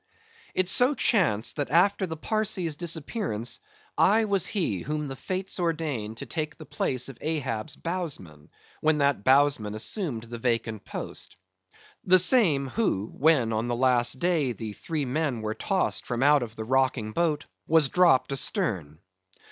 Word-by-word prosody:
It 185 -1 +1
so 250 +9 +3
chanced, 160 - +1
that 145 - -2
after 190 +5 +3
the 160 -1 -6
Parsee's 195 -5 -1
disappearance, 160 - -3 0.4
I 220 +3 +4
was 200 -4 0
he 170 - -1
whom 150 - -3
the 135 - -6
Fates 185 +6 -4
ordained 150 -11 -2
to - - -6
take 155 -2 -4
the 155 - -10
place 130 -2 -2
of 135 -3 -10
Ahab's 140 -4 -2
bowsman, 140 - -5 0.3
when 155 0 +2
that 140 -7 +1
bowsman 130 -5 +3
assumed 120 - -2
the 120 0 -8
vacant 115 -3 -2
post; - - -6 0.7
the 185 0 +6
same, 170 - +4
who, 110 - -1
when 135 -6 +3
on 110 +2 -1
the 120 - -1
last 125 0 +2
day 155 -5 +1
the 110 -2 -6
three 155 +5 -3
men 130 -3 -2
were 110 0 -2
tossed 110 - -1
from 120 +1 -1
out 145 0 +5
of 115 -2 -6
the 110 - -5
rocking 130 -3 +1
boat, 155 +3 0 0.2
was 160 -2 +5
dropped 170 -4 +3
astern. 90 - 0
140 Hz, 155 wpm, -26 LUFS, 115-170 Hz, 0.7 s, the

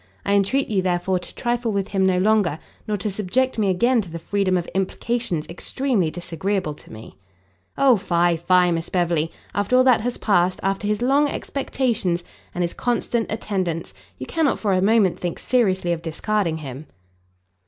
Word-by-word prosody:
I 200 - +1
entreat 205 +8 +2
you, 200 -3 +1
therefore, 180 0 0
to 180 - -12
trifle 240 -2 -1
with 200 -2 -2
him 190 -1 +2
no 185 -1 +2
longer, 195 -4 +2 0.3
nor 210 -1 0
to 205 +2 -2
subject 225 +6 0
me 205 -2 +2
again 235 +6 +3
to 190 - -9
the 165 - -6
freedom 185 +2 0
of 175 - -2
implications 195 -2 -1
extremely 210 - -1
disagreeable 175 +1 -3
to - - -16
me." 110 -3 -11 0.6
"O 265 -4 +5
fie, 175 -2 +2
fie, 180 +1 +3
Miss 165 0 -2
Beverley! 170 -3 0 0.2
after 205 +5 +2
all 255 - +6
that 255 -4 +4
has 245 +2 -2
passed, 185 -3 +2
after 195 +2 -1
his 210 +3 0
long 280 +3 +3
expectations, 235 -12 -1 0.3
and 175 - 0
his 170 - -2
constant 235 -2 -1
attendance, 190 -6 -2 0.2
you - - -6
cannot 320 -4 +1
for 205 -3 0
a 185 - +2
moment 200 -3 +3
think 175 -2 -3
seriously 190 -8 +1
of 170 -1 -1
discarding 170 +1 -1
him." 145 -1 -8
195 Hz, 175 wpm, -22 LUFS, 175-225 Hz, 0.6 s, all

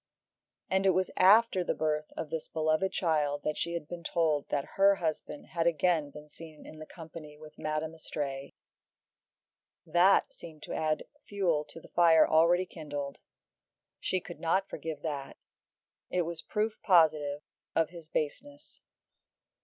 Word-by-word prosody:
And 190 +1 +1
it 185 - +4
was 185 0 +1
after 195 0 +5
the - - -1
birth 150 -1 -1
of 155 - -5
this 160 -1 -3
beloved 155 +4 0
child 150 -4 0
that 150 - -1
she 170 - -2
had 165 -3 -4
been 175 0 -7
told 155 -4 0
that 140 -1 -2
her 200 0 +5
husband 160 -4 -4
had 170 -1 0
again 165 -2 +2
been 150 +1 -12
seen 155 0 -13
in 155 0 -10
company 160 -3 -11
with 155 0 -14
Madame 155 +1 -2
Istray; 140 -4 -5 1.3
that 185 +3 +4
seemed 160 -3 -12
to - - -6
add 155 -1 0 0.2
fuel 180 -7 0
to 165 - -12
the - - -15
fire 165 -2 +5
already 170 +3 +4
kindled. 145 -5 -6 0.8
She 185 - 0
could 175 -1 -10
not 190 +4 +1
forgive 155 -2 -6
that. 145 -3 -4 0.7
It 180 - +1
was 170 0 -5
proof 215 +1 -2
positive 155 -5 +3 0.3
of 165 0 +2
his 170 -3 -11
baseness. 285 - -4
160 Hz, 150 wpm, -30 LUFS, 150-175 Hz, 1.3 s, after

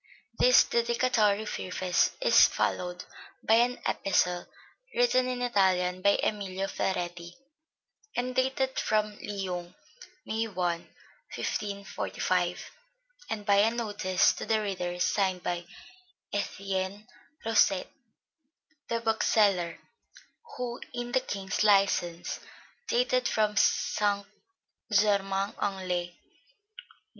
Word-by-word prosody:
This 250 0 +7
dedicatory 235 -3 +1
preface 185 -2 0
is - - +6
followed 180 0 -2 0.4
by 220 - +3
an 240 +2 +3
epistle, 180 -2 0 0.5
written 245 +1 +3
in 250 -1 -2
Italian 185 -5 +2
by 200 +1 +4
Emilio 195 -2 -2
Ferretti, 175 -3 -3 0.8
and 250 +1 -1
dated 265 0 0
from 215 -1 0
Lyons, 185 -3 -5 0.5
May 225 +1 -1
I, 180 -4 -1 0.6
1545; 190 -3 -2 0.6
and 210 -2 -4
by 200 -1 +4
a 210 +2 +5
notice 205 -5 +1
to - - -7
the 220 -1 +1
reader 180 -3 -3
signed 185 -1 +1
by 175 0 -2 0.7
Etienne 195 0 -3 0.4
Rosset, 210 -4 +3 1.0
the 230 0 -1
bookseller, 205 -6 +2 0.8
who 245 -1 -4
in 240 0 -4
the 260 - +3
King's 195 -1 -2
license, 195 -4 +2 0.5
dated 250 - +1
from 215 -1 +1
St. 205 0 +1 0.7
Germain 200 -1 +2
en 190 -2 -2
Laye, 175 -1 0
Nov. 175 - -22
200 Hz, 100 wpm, -29 LUFS, 185-225 Hz, 1.0 s, This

